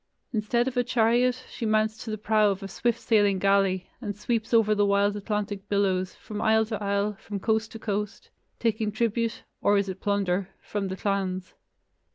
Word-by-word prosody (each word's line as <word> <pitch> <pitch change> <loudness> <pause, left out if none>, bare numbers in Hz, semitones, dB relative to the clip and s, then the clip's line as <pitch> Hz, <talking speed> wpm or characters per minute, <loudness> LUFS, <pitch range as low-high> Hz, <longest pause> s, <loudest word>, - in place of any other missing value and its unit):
Instead 235 +3 +1
of 265 - -3
a 245 - +3
chariot, 245 +2 +2
she - - -8
mounts 215 0 +2
to 225 - -8
the 215 - -2
prow 215 0 +3
of 195 -1 -3
a - - -4
swift 235 +3 -1
sailing 205 -5 +3
galley, 195 -1 +2
and 205 -4 -4
sweeps 225 +1 -2
over 225 -2 +4
the 205 -1 +2
wild 200 0 +2
Atlantic 205 -1 -3
billows, 190 -2 +1
from 210 -1 -7
isle 220 0 +4
to 215 -1 -4
isle, 200 +1 0
from 205 -1 -5
coast 220 +1 0
to - - -6
coast, 210 -2 -4 0.3
taking 220 -2 0
tribute 230 +1 -1 0.2
(or 205 0 +4
is 200 -1 0
it 190 0 -6
plunder?) 195 -2 0
from 205 -2 -3
the 190 0 -4
clans. 190 -2 -2
210 Hz, 190 wpm, -27 LUFS, 200-220 Hz, 0.3 s, over